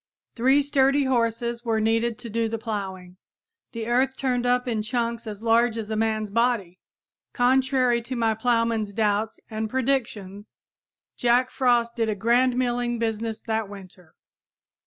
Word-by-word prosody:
Three 265 +4 +3
sturdy 275 0 +3
horses 235 -2 0
were 225 -2 0
needed 225 +1 +1
to 235 - -9
do 230 +1 0
the 225 - -3
plowing. 190 -5 -6 0.5
The 230 -1 -5
earth 260 +3 +1
turned 250 -2 0
up 250 0 +1
in 225 -3 -1
chunks 235 0 -2
as 210 0 -7
large 230 0 +3
as 220 -1 -5
a - - -1
man's 215 -1 -1
body. 220 -6 0 0.5
Contrary 255 -1 +2
to 255 +3 -6
my 225 -2 +1
plowman's 230 -2 0
doubts 215 0 0
and 220 -1 -4
predictions, 220 -6 -2 0.6
Jack 245 +1 +2
Frost 240 -2 +1
did 225 -2 0
a 215 - -1
grand 240 +4 +2
milling 245 -1 0
business 225 -1 -3
that 220 -2 -2
winter! 185 -4 -13
230 Hz, 150 wpm, -25 LUFS, 220-245 Hz, 0.6 s, Three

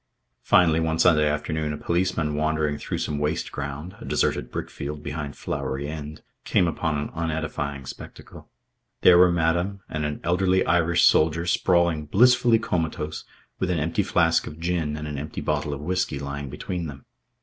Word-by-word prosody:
Finally, 80 -2 +4
one 80 0 0
Sunday 80 -3 +4
afternoon, 75 +1 -2
a 75 - -4
policeman 85 -3 0
wandering 75 0 0
through - - -4
some 75 -1 -2
waste 75 +2 -1
ground, 75 +5 -6
a - - -8
deserted 60 - 0
brickfield 75 +1 -5
behind 75 0 -5
Flowery 70 +2 -3
End, 75 0 -7 0.2
came 90 - +2
upon 80 -2 -1
an 70 - -4
unedifying 80 -4 -3
spectacle. - - -11 0.5
There 90 -1 +7
were 90 0 +6
madam 85 +4 0
and 75 0 -3
an 75 0 -3
elderly 90 +2 +2
Irish 85 +1 +3
soldier 80 +2 +4
sprawling 85 -3 +2
blissfully 120 +4 +5
comatose 80 -7 -3 0.3
with 95 - -1
an 90 - +1
empty 80 +2 0
flask 80 0 +2
of 75 - -9
gin 80 -3 -1
and 75 0 -5
an 75 -2 -4
empty 75 +2 -6
bottle 75 -1 -1
of 70 0 -5
whisky 90 -2 -1
lying 70 0 -5
between 90 +2 -4
them. 70 -2 -10
80 Hz, 165 wpm, -25 LUFS, 75-85 Hz, 0.5 s, There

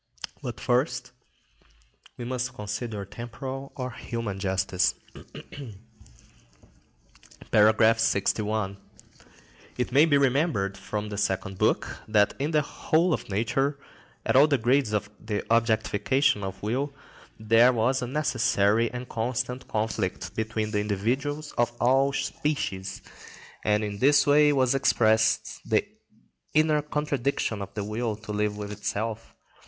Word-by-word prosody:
But - - -6
first - - 0 1.1
we 120 - -6
must 125 +1 -3
consider 105 -1 -4
temporal 130 +6 -7
or 130 -2 -4
human 115 -4 -5
justice.(73) 95 +5 -3 1.8
§ 110 +1 +5
61. 105 -1 0 1.0
It 125 - -1
may 140 +5 +6
be 145 -3 +4
remembered 135 - +1
from 105 +2 -5
the 105 -1 -4
Second 95 -1 -2
Book - - 0
that 105 -1 +3
in 145 +2 0
the 155 -2 +2
whole 165 +4 +1
of - - -4
nature, 135 +8 0 0.5
at - - +1
all 140 +3 +7
the 145 -2 +2
grades 125 0 +2
of 105 0 -2
the 105 -2 -3
objectification 115 +1 +2
of 95 0 -6
will, 130 +7 -1 0.5
there 115 +3 +5
was 125 +2 +1
a 125 - -3
necessary 115 -5 +2
and 125 0 -6
constant 125 +2 -3
conflict 105 -5 -2
between 110 0 -2
the 105 - 0
individuals 130 +9 -2
of 120 0 +3
all 135 +3 +3
species; 135 -9 -3 0.6
and 105 0 +2
in 100 -1 -4
this 145 +2 +5
way 150 +1 +5
was 130 -3 +2
expressed 110 -5 +2
the - - +1 0.7
inner 155 -1 +4
contradiction 140 -7 -1
of 100 0 -6
the 105 - -2
will 110 +2 -2
to 110 0 -9
live 105 0 -1
with 105 0 -5
itself. 110 +2 -4
115 Hz, 125 wpm, -26 LUFS, 105-135 Hz, 1.8 s, all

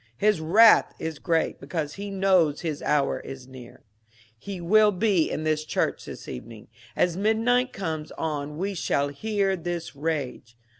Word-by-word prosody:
His 210 -2 +2
wrath 215 +8 +6
is 160 -3 -5
great, 165 -3 0
because 145 +1 -4
he 200 +1 -6
knows 190 -6 +2
his 155 -4 -3
hour 145 -2 +1
is 130 -2 -9
near. 130 -2 -13 0.5
He 190 - -7
will 210 +5 +4
be 190 -4 +2
in 155 - -3
this 155 -1 0
church - - -1
this - - -9
evening. 110 - -9 0.3
As 175 -2 +1
midnight 225 +5 +2
comes 160 -5 -4
on 150 -2 -4
we 195 +4 -2
shall 145 -5 0
hear 200 +5 -1
his 170 -2 -5
rage. 140 -6 -4
165 Hz, 155 wpm, -26 LUFS, 145-195 Hz, 0.5 s, wrath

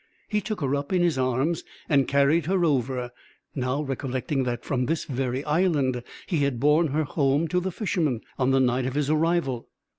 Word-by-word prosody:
He 210 -1 +1
took 215 -2 -4
her 140 -1 0
up 140 0 -2
in 180 -2 +3
his 165 -6 +1
arms, 130 +6 0 0.2
and 140 -3 +3
carried 140 +3 +3
her 185 -1 +2
over, 130 -4 0 0.4
now 130 +2 -1
recollecting 135 0 -2
that 120 -1 -3
from 125 -3 0
this 165 0 -1
very 130 0 -2
island 150 -6 +1 0.2
he 175 - -1
had 140 -4 0
borne 150 +4 +4
her 155 +2 0
home 145 +1 +1
to 180 - +2
the 190 +1 -3
Fisherman, 165 - -1 0.2
on 130 0 +2
the 135 0 +4
night 125 0 +2
of 130 - -4
his 145 0 +1
arrival. 155 -6 0
140 Hz, 190 wpm, -26 LUFS, 130-165 Hz, 0.4 s, borne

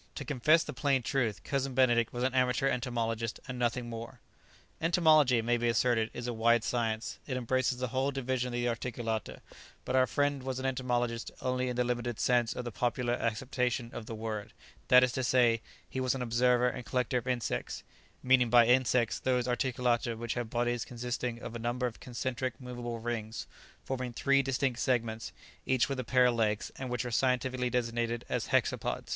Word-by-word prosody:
To - - -5
confess 150 +4 +3
the - - -6
plain 135 -3 +1
truth, 120 -5 -1
Cousin 135 -2 -2
Benedict 120 -3 +3
was 120 0 -3
an 130 0 +1
amateur 130 +1 +2
entomologist, 115 -3 -2
and 125 -1 -5
nothing 120 0 0
more. 115 +2 -7 0.6
Entomology, 155 -6 +5
it 115 - -1
may 120 0 +2
be 120 0 0
asserted, 115 -1 +2
is 120 - -6
a 120 - -2
wide 115 0 +3
science; 115 -2 -2
it 130 -3 -2
embraces 130 +1 0
the 125 -1 -2
whole 130 +3 0
division 130 -2 -1
of 125 - -6
the 120 0 0
articulata; 115 -2 -3 0.4
but 125 - -1
our 130 0 +4
friend 145 -1 0
was 130 0 -3
an 130 - -4
entomologist 120 -3 -1
only 130 0 -1
in 125 - -3
the 125 - +2
limited 120 -1 -2
sense 120 -2 +2
of 125 - -4
the 120 - -4
popular 120 +3 0
acceptation 120 +1 -1
of 110 - -7
the 115 - -5
word; 110 -1 -5 0.3
that 125 0 +7
is 125 - +2
to 130 - -2
say, 120 -2 +3 0.3
he 130 - -5
was 130 0 +1
an 130 - -4
observer 125 +1 +3
and 125 0 -3
collector 125 0 0
of 120 - -12
insects, 120 - -2 0.4
meaning 125 -2 +4
by 120 0 +7
"insects" 125 -1 +3
those 125 -1 0
articulata 120 -2 0
which 120 0 -3
have 120 -2 -3
bodies 120 0 0
consisting 120 0 -4
of 120 - -7
a - - -4
number 120 +2 -1
of 120 -2 -4
concentric 125 0 -3
movable 120 -2 -5
rings, 115 -1 -4 0.4
forming 130 -2 -3
three 140 +3 +3
distinct 135 -2 -1
segments, 115 -3 -1 0.4
each 130 -2 +3
with 135 -2 -3
a - - -1
pair 125 +2 +4
of 125 - +4
legs, 110 -2 0
and 130 -1 -5
which 125 0 -2
are 125 - -4
scientifically 125 0 +1
designated 120 -1 -1
as - - -1
hexapods. - - 0
125 Hz, 195 wpm, -31 LUFS, 115-130 Hz, 0.6 s, that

